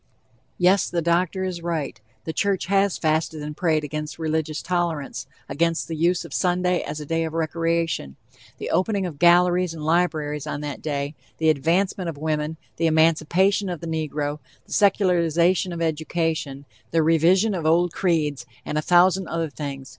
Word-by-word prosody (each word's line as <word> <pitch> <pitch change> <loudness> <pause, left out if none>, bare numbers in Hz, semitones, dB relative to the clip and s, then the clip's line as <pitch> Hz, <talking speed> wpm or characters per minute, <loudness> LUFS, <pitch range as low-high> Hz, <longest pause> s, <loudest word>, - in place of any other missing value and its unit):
Yes, 185 +2 +3
the 170 -1 -1
doctor 175 +3 +1
is 180 -2 -3
right, 160 -10 -3 0.2
the 160 - -3
church 195 +3 0
has 195 0 +2
"fasted 155 -1 -1
and 150 0 -6
prayed" 155 -3 +1
against 150 +1 -5
religious 160 -1 -2
tolerance, 170 -7 -2 0.2
against 165 +1 0
the 165 - -4
use 170 +3 +1
of - - -10
Sunday 180 0 +1
as 150 - -5
a 150 - -6
day 165 +2 0
of 160 -1 -4
recreation, 165 - -1 0.4
the - - -5
opening 195 0 +1
of 155 -5 -6
galleries 175 0 +4
and 155 -1 -6
libraries 155 -3 0
on 145 - -4
that 145 -2 -5
day, 145 -1 -3 0.2
the 160 -1 +4
advancement 175 +5 0
of 155 - -7
women, 155 +1 -2 0.2
the 165 - +2
emancipation 165 +5 +2
of 175 -3 -4
the 170 - -8
negro, 150 -2 -3 0.3
the - - -9
secularization 180 -3 +2
of 170 -1 -3
education, 160 -3 -2 0.2
the 165 -1 +2
revision 175 +7 +3
of 165 -4 -2
old 170 +2 +3
creeds, 155 -6 0 0.2
and 150 - -1
a - - -1
thousand 180 +2 +4
other 165 -2 -2
things. 135 -2 -6
165 Hz, 170 wpm, -23 LUFS, 155-180 Hz, 0.4 s, galleries